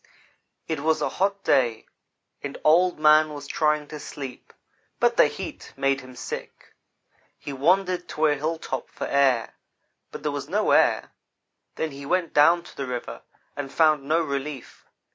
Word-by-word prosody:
"It 160 -2 -2
was 160 +2 +1
a - - 0
hot 200 0 +1
day, 120 -4 +2 0.6
and 140 -1 -6
Old 175 +4 +4
man 155 0 +5
was 145 -1 -8
trying 150 0 0
to 150 - -7
sleep, 135 -3 -8 0.5
but - - +3
the - - +6
heat - - -8
made 135 0 +1
him 130 0 -13
sick. - - -8 0.6
He 140 - -7
wan 180 +9 +3
dered 180 -1 -4
to 155 - 0
a 150 - +4
hilltop 145 -3 -3
for - - -6
air; 135 -4 +2 0.6
but - - -9
there 150 - 0
was 145 0 -5
no 210 +4 +1
air. - - +3 0.6
Then 160 - -2
he 140 0 -9
went 180 -1 0
down 170 +4 +5
to - - -14
the 140 - -4
river 125 -1 -5 0.3
and 140 -2 -5
found 155 -3 +3
no 160 +3 +2
relief. 140 -2 -6
150 Hz, 165 wpm, -25 LUFS, 140-160 Hz, 0.6 s, the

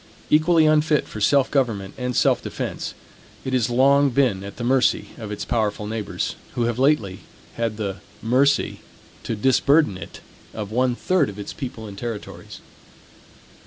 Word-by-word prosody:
Equally 160 +1 +5
unfit 155 0 +3
for 110 - -8
self 140 +4 +3
government 110 -8 0
and 125 -1 -3
self - - +3
defense, - - -5 0.5
it 130 - -3
has 125 -2 +2
long 140 +3 +4
been 120 -7 +1
at 100 0 -9
the 120 - -5
mercy 130 +1 +2
of 110 -2 -6
its 105 - -4
powerful 110 -3 -1
neighbors; 110 -1 -3 0.2
who 120 - 0
have 120 +1 -1
lately 130 -10 +2 0.3
had 115 -2 -2
the 100 -3 -3 0.2
mercy 130 +6 +2 0.4
to 115 - -3
disburden 135 - +3
it 85 - -10 0.4
of 105 -2 -5
one 125 +1 +1
third 180 +1 +1
of 100 - -9
its 100 - -6
people 125 -4 -6
and 100 -2 -9
territories. 115 -4 -7
120 Hz, 160 wpm, -23 LUFS, 105-140 Hz, 0.5 s, Equally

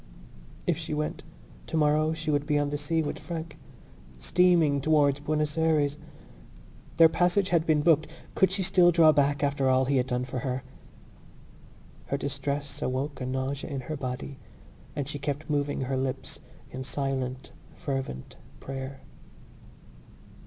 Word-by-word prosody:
If 170 -4 +1
she 155 -2 -3
went, 150 0 -2 0.5
tomorrow 155 0 +2
she 155 -1 -2
would 145 0 0
be 150 -1 +2
on 145 0 0
the 145 - -1
sea 160 +2 0
with 145 - -4
Frank, 165 -2 -6 0.6
steaming 160 - +3
towards 145 -2 +3
Buenos 150 +1 -1
Ayres. 150 -2 +2 1.0
Their 165 - +9
passage 180 +4 +2
had 170 -2 +2
been 155 -2 +4
booked. 155 -1 +4 0.3
Could 190 - +4
she 190 0 0
still 180 -1 +5
draw 165 -2 +6
back 145 -1 +2
after 140 -2 +1
all 130 0 +4
he 140 +1 +2
had 125 0 +1
done 125 0 -1
for 130 0 -4
her? 130 0 -3 1.4
Her 140 - -1
distress 140 +1 -3
awoke 135 +2 -2
a 125 - -2
nausea 130 +2 -3
in 135 -2 -3
her 155 +5 -5
body 130 0 -5 0.6
and 140 -2 -2
she 145 0 -5
kept 145 +2 -3
moving 145 -1 0
her 130 0 -1
lips 130 0 -3 0.3
in 130 +1 -5
silent 130 -1 -3 0.2
fervent 135 - -5 0.2
prayer. 135 0 -6
145 Hz, 150 wpm, -28 LUFS, 135-155 Hz, 1.4 s, Their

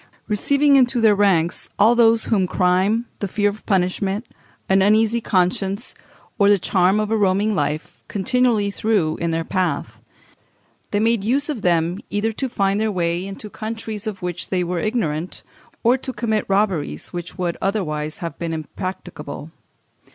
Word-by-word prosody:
Receiving 280 +7 +3
into 245 -1 +3
their 220 -2 +5
ranks 185 -4 +2
all 220 +4 +5
those 230 -1 +4
whom 195 -5 +1
crime, 190 +6 +2
the 200 - -2
fear 205 +2 +1
of 205 +1 -8
punishment, 195 +2 0 0.4
an 190 0 +4
uneasy 220 +3 +3
conscience, 195 +3 0 0.5
or 200 0 +5
the 205 - +6
charm 190 +2 +2
of 215 0 -1
a - - +3
roaming 205 +1 +2
life, 150 -3 -3
continually 215 0 +1
threw 200 -7 +1
in 170 - -1
their 165 0 -1
path, 185 +1 -2 0.9
they 205 - 0
made 225 -1 +2
use 275 +7 +1
of 270 -8 -3
them 170 0 +1
either 205 +2 0
to 260 +4 -3
find 200 -2 0
their 220 0 +1
way 175 -1 -1
into 195 +2 -7
countries 220 0 -6
of 195 -4 -5
which 180 0 -4
they 185 -1 0
were 175 0 -2
ignorant, 175 -6 -2 0.4
or 245 +3 +4
to 260 - -4
commit 220 -4 -1
robberies 195 -6 0
which 175 -1 -7
would 175 -2 -1
otherwise 155 -7 -2
have 165 -4 -6
been 170 -1 -3
impracticable. 175 +4 -6
200 Hz, 160 wpm, -21 LUFS, 180-220 Hz, 0.9 s, the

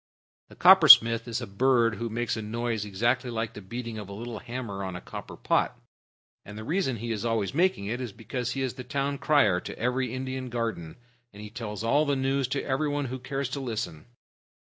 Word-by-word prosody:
The - - -14
Coppersmith 125 -11 +8
is 120 +2 -3
a - - -4
bird 115 +2 +2
who 115 +2 -3
makes 120 +2 -2
a 110 - -4
noise 115 0 -2
exactly 120 +6 0
like 115 -1 -3
the 105 - -9
beating 115 +2 -6
of 100 -2 -8
a - - -7
little 115 +1 -6
hammer 120 -5 -5
on 95 -1 -5
a - - -5
copper - - -9
pot; - - 0 0.6
and 105 +1 -10
the 110 - -6
reason 155 - 0
he 115 +1 -5
is 105 -3 -3
always 115 -2 -1
making 175 - +1
it 120 +5 -3
is 120 -4 -4
because 120 +3 -4
he 135 - -2
is 130 - -2
the 125 - -8
town 140 +1 -2
crier 105 -12 +3
to - - -8
every 125 +1 -1
Indian 130 0 -4
garden, 115 -9 -3 0.4
and 105 +1 -11
tells 110 -3 -5
all 145 +6 +2
the 140 - +2
news 135 0 0
to 135 +2 -2
everybody 145 0 -1
who 130 +1 -5
cares 135 +2 -3
to 140 - -4
listen. 110 - -5
120 Hz, 210 wpm, -27 LUFS, 110-130 Hz, 0.6 s, Coppersmith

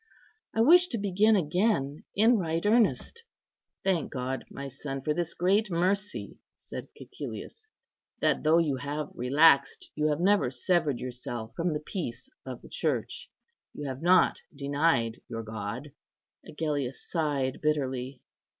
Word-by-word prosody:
I 225 - +3
wish 350 +8 +7
to 240 - -2
begin 205 +2 +3
again 170 -4 0
in 225 +3 +5
right 165 0 -1
earnest." 220 - +2 0.6
"Thank 185 -5 0
God, 130 0 -3
my 140 0 -7
son, 135 0 -6
for 150 - +1
this 170 +1 -3
great 195 +4 +2
mercy," 190 +4 -1 0.2
said - - -8
Cæcilius, 435 -1 -8 0.5
"that, - - +2
though 155 +2 +4
you 155 -5 +2
have 145 +3 -4
relaxed, 140 +3 +3
you 150 0 0
have 150 0 0
never 195 -6 +3
severed 155 0 +1
yourself 120 -2 -6
from 170 -1 0
the 150 - -1
peace 165 - -5 0.2
of - - -7
the - - -11
Church, - - -2 0.5
you 145 - -5
have 130 0 -5
not 180 +2 +4
denied 140 -4 +1
your 115 0 -5
God." 110 +6 -6 0.6
Agellius 145 -4 -3
sighed 145 -6 -1
bitterly. 135 -4 -1
150 Hz, 140 wpm, -28 LUFS, 135-185 Hz, 0.6 s, wish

